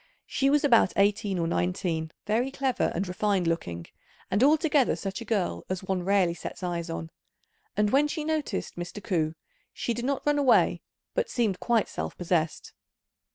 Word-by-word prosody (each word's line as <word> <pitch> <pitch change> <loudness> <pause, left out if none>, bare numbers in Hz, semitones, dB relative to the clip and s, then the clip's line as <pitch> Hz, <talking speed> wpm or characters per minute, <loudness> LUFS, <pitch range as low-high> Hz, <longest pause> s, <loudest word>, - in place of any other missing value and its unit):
She 275 0 +1
was 290 +1 +3
about 235 -10 +5
eighteen 200 0 +2
or 170 - 0
nineteen, 170 -2 -1
very 230 +5 +1
clever 270 -2 0
and 190 +2 -1
refined 185 0 0
looking, 85 - -2 0.5
and 200 +6 +3
altogether 300 -2 +4
such 195 +1 -5
a - - -6
girl 205 -6 -1
as 185 0 -3
one 190 -1 -1
rarely 185 -2 +2
sets 170 +2 -8
eyes 170 -1 -2
on; 165 0 -5 0.7
and 210 0 +2
when 285 +2 +4
she 310 +1 -3
noticed 315 - -2
Mr. 175 +4 -6
Ku, 160 -4 0 0.4
she 235 - -2
did 240 +1 -4
not 275 +2 -1
run 295 0 +3
away, 265 -4 +4 0.3
but - - 0
seemed 215 -7 0
quite 235 -3 +2
self 80 0 -5
possessed. 165 -3 -1
200 Hz, 170 wpm, -27 LUFS, 175-255 Hz, 0.7 s, about